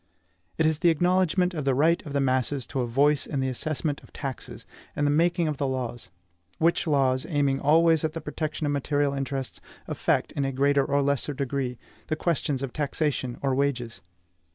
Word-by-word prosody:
It 160 - +2
is 155 -1 +2
the 170 - +4
acknowledgment 180 +2 +2
of 155 -4 -3
the 135 -1 +2
right 160 +5 +3
of 140 - -6
the 140 - +1
masses 130 0 +1
to 135 - -1
a 120 - -1
voice 140 +4 +2
in 140 - -2
the 130 0 0
assessment 145 +2 -2
of - - -18
taxes, 135 -3 -6 0.3
and 145 - 0
the 145 - +3
making 170 +2 +2
of 150 -2 -2
the 140 - 0
laws; 125 -5 -4 0.5
which 170 +1 +2
laws, 130 -3 +2
aiming 140 -4 +1
always 160 +2 +4
at 155 -1 -1
the 165 - -4
protection 155 0 -3
of 145 - 0
material 145 0 0
interests, 135 -1 -3 0.3
affect, - - 0
in 140 - -2
a 135 - 0
greater 140 +1 +3
or 140 0 +1
less 140 -1 0
degree, 135 -3 -2 0.3
all 155 - 0
questions 150 -5 -1
of 135 - -4
taxation 145 -4 -1
or 135 -1 +1
wages. 130 -4 -1
140 Hz, 195 wpm, -26 LUFS, 135-155 Hz, 0.5 s, the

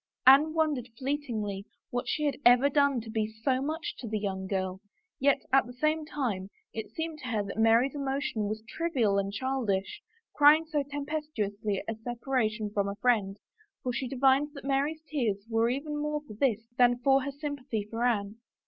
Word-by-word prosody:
Anne 290 +5 +7
wondered 295 -7 0
fleetingly 235 -8 -3 0.3
what 245 0 -2
she 300 - -1
had 290 -2 +1
ever 245 +3 +6
done 280 -2 +3
to 225 - -9
be 220 -1 0
so 225 +4 -1
much 315 +4 -3
to 240 - -6
the 215 0 -1
young 190 -2 -3
girl, 190 -1 -2 0.4
yet 280 +1 +3
at 270 -2 +5
the 245 - -9
same 305 +4 0
time 215 -11 -2 0.2
it 220 - -5
seemed 320 -1 -5
to 265 - -7
her 220 -4 0
that 200 - -6
Mary's 230 +4 +4
emo 275 -1 -1
tion 270 -8 -2
was 215 +1 -4
trivial 240 -11 +1
and 195 0 -2
childish, 245 - -2 0.3
crying 300 +2 +6
so 310 -2 0
tempestuously 280 -9 -3
at 225 - -2
a - - -22
separation 225 -3 -1
from 200 -1 0
a 200 - -4
friend, 210 -4 +1 0.5
for 250 - -1
she 255 +2 -2
divined 270 +3 +3
that 275 - -9
Mary's 285 +3 0
tears 220 -10 -1
were 225 0 +2
even 290 +4 -3
more 300 0 -2
for 215 - -10
this 225 -1 0
than 245 0 +5
for 270 +2 +3
her 280 +2 -3
sympathy 280 -6 -4
for 230 +2 -3
Anne. 215 -3 0
250 Hz, 190 wpm, -29 LUFS, 215-285 Hz, 0.5 s, Anne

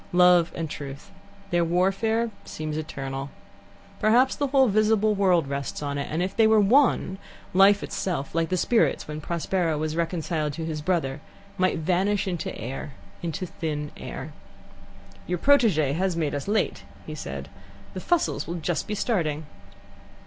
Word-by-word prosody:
Love 180 -1 +5
and 165 -1 -3
Truth 145 +5 -8 0.4
their 175 0 +3
warfare 195 +7 +1
seems 155 -1 -5
eternal. 135 -3 -4 0.7
Perhaps 240 +5 +4
the 285 - 0
whole 265 -1 +4
visible 215 0 +3
world 185 -6 +3
rests 140 +1 -4
on 140 0 -2
it, 140 - -3
and 165 +3 -1
if 190 +1 -3
they 225 -1 +5
were 220 0 +5
one, 210 -3 +3 0.3
life 195 +2 +6
itself, 165 -7 -3
like 165 -1 0
the 185 - 0
spirits 230 +6 +2
when 150 0 -5
Prospero 170 0 -1
was 155 +1 -2
reconciled 165 -2 -1
to 160 +2 -4
his 155 -2 -3
brother, 150 -5 -1 0.3
might 185 -2 +1
vanish 190 +5 +1
into 175 -4 -3
air, 135 +5 -6 0.3
into 170 +2 -3
thin 150 -4 -4
air. - - -7 0.9
"Your 180 - 0
protege 195 - +4
has 180 +1 0
made 155 -3 0
us 145 +3 -4
late," 215 +1 0 0.3
said - - -6
he. - - -24 0.4
"The - - -5
Fussells 350 -2 0
will 170 - -3
just 170 -1 -2
be 210 - -2
starting." 160 -9 -1
175 Hz, 155 wpm, -25 LUFS, 155-200 Hz, 0.9 s, life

